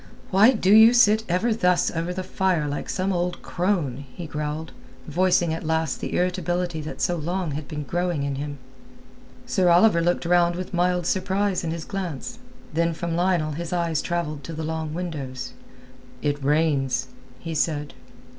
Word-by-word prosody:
"Why 200 +5 +7
do 200 -4 +3
you 225 +2 +8
sit 220 -2 +5
ever 185 +7 +2
thus 180 -5 +2
over 165 +1 -2
the 185 +1 -4
fire 185 -4 0
like 145 0 -4
some 190 +1 0
old 175 0 -2
crone?" 170 -8 -1
he 175 - -6
growled, 150 +1 -4 0.4
voicing 180 -2 +2
at 165 - -4
last 160 -2 0
the - - -3
irritability 180 -2 -1
that 150 - -7
so 175 - +1
long 170 +1 -2
had 145 +1 -5
been 150 -1 -5
growing 175 0 -1
in 140 0 -1
him. 145 +1 -5 0.9
Sir 185 -2 +2
Oliver 175 0 +5
looked 175 +1 0
round 175 0 +3
with 185 +1 -6
mild 180 0 +1
surprise 190 +1 0
in 165 - -2
his 165 0 -4
glance. 195 - -5 0.3
Then 165 +1 +1
from 170 0 -3
Lionel 175 -3 +1
his 165 +3 -5
eyes 170 -3 0
travelled 155 -5 -3
to 165 - -6
the 160 0 -4
long 160 0 -3
windows. 135 -8 -5 0.7
"It 145 -1 -1
rains," 140 -3 +1 0.3
he 165 +4 -5
said. 150 -2 -1
170 Hz, 170 wpm, -24 LUFS, 155-180 Hz, 0.9 s, you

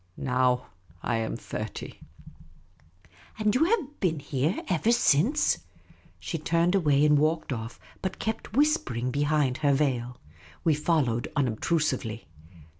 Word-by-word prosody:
Now 125 -1 +1 0.4
I 115 - 0
am 110 -1 -2
thirty." - - -6 0.7
" 85 +3 -28
And 215 -1 +1
you 270 +7 +3
have 340 - -1
been 170 -5 +1
here 145 +4 -1
ever 185 +5 +2
since? 235 - +3 0.3
" - - -28
She 165 - -4
turned 170 +3 +1
away 150 -6 +3
and 150 -1 +5
walked 155 -1 0
off, 115 0 -6 0.2
but 190 - -3
kept 220 -1 -4
whispering 135 - +1
be 145 - -1
hind 145 -3 +1
her 145 -2 +2
veil. 125 -4 -1 0.5
\Vc 155 -3 +3
followed, 140 -8 +1
unobtrusively. 130 -3 -1
150 Hz, 135 wpm, -27 LUFS, 125-175 Hz, 0.7 s, and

